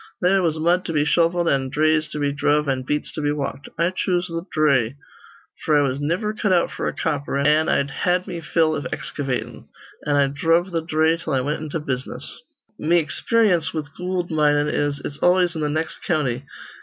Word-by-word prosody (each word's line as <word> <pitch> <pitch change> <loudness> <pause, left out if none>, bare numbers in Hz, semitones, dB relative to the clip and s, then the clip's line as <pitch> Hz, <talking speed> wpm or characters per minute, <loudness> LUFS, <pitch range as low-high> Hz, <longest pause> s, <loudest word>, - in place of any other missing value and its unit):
They 190 +2 +3
was 165 -4 0
mud 175 +3 +2
to 165 - -3
be 150 -1 +2
shovelled 170 +2 +2
an' 135 -3 +1
dhrays 155 +2 +2
to - - -6
be 145 -1 0
dhruv 145 +1 +1
an' 135 -1 0
beats 150 +3 -2
to 155 - -4
be 145 0 +1
walked. 140 -1 -4
I 170 +2 +2
choose 180 -1 0
th' 165 +1 -5
dhray; 140 -6 +2 0.7
f'r 155 -2 +3
I 145 - +2
was 130 +1 -2
niver 180 +9 -1
cut 210 -2 -1
out 175 -2 +2
f'r - - -2
a - - -3
copper, 140 -1 -2
an' 150 +3 +3
I'd 140 0 +1
had 180 +5 0
me 180 -4 -5
fill 160 0 +1
iv 145 -4 -3
excavatin'. 135 -3 -4 0.4
An' 145 - +2
I 140 -1 +4
dhruv 165 +6 +1
th' 165 -1 -3
dhray 160 +1 +2
till 155 - -2
I 130 - +2
wint 150 +4 -2
into 155 +1 -3
business. 130 - -5 0.4
"Me 170 +3 +3
experyence 175 +2 +1
with 145 -2 -5
goold 180 -1 -3
minin' 150 -1 +2
is 145 -1 -1
it's 145 0 -6
always 180 -1 +3
in 160 - -3
th' 150 - 0
nex' 155 +2 -2
county. 135 -7 -1
155 Hz, 205 wpm, -22 LUFS, 145-170 Hz, 0.7 s, I